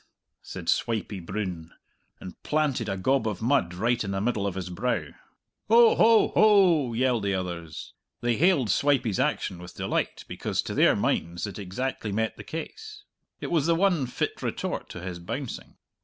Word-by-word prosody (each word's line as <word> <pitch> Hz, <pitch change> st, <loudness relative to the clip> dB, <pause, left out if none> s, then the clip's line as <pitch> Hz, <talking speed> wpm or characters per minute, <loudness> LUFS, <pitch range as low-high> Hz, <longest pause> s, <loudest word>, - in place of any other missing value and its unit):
"Ph -, -, -38 dB, 0.3 s
tt!" -, -, -23 dB
said -, -, -7 dB
Swipey 110 Hz, -3 st, 0 dB
Broon, 90 Hz, -3 st, -5 dB, 0.5 s
and 90 Hz, -, -10 dB
planted 145 Hz, -7 st, 0 dB
a 95 Hz, -, -2 dB
gob 130 Hz, +6 st, +1 dB
of 105 Hz, -, -3 dB
mud 115 Hz, -8 st, +1 dB
right 115 Hz, +5 st, +1 dB
in 100 Hz, -, -4 dB
the 95 Hz, 0 st, -1 dB
middle 105 Hz, -1 st, 0 dB
of 95 Hz, -, -3 dB
his 90 Hz, -1 st, -5 dB
brow. 120 Hz, +8 st, -1 dB, 0.6 s
"Hoh! 230 Hz, +1 st, +7 dB
hoh! 225 Hz, 0 st, +5 dB
hoh!" 180 Hz, -, +4 dB
yelled 125 Hz, -1 st, +1 dB
the 100 Hz, -1 st, 0 dB
others. 85 Hz, -4 st, -6 dB, 0.3 s
They 120 Hz, -1 st, +1 dB
hailed 150 Hz, -, +3 dB
Swipey's 130 Hz, -4 st, +1 dB
action 90 Hz, -, -1 dB
with 90 Hz, 0 st, -11 dB
delight -, -, -2 dB
because, -, -, -2 dB
to -, -, -5 dB
their -, -, +4 dB
minds, 85 Hz, +1 st, -1 dB
it 100 Hz, -2 st, -7 dB
exactly 105 Hz, +3 st, -4 dB
met 110 Hz, +2 st, -1 dB
the -, -, -10 dB
case. 420 Hz, -, -8 dB, 0.4 s
It -, -, -4 dB
was 160 Hz, -3 st, +2 dB
the 170 Hz, -, +4 dB
one 175 Hz, -7 st, +2 dB
fit 120 Hz, -, -3 dB
retort -, -, -3 dB
to 90 Hz, -, -8 dB
his 90 Hz, -1 st, -6 dB
bouncing. 125 Hz, +9 st, -6 dB
115 Hz, 180 wpm, -26 LUFS, 95-145 Hz, 0.6 s, Hoh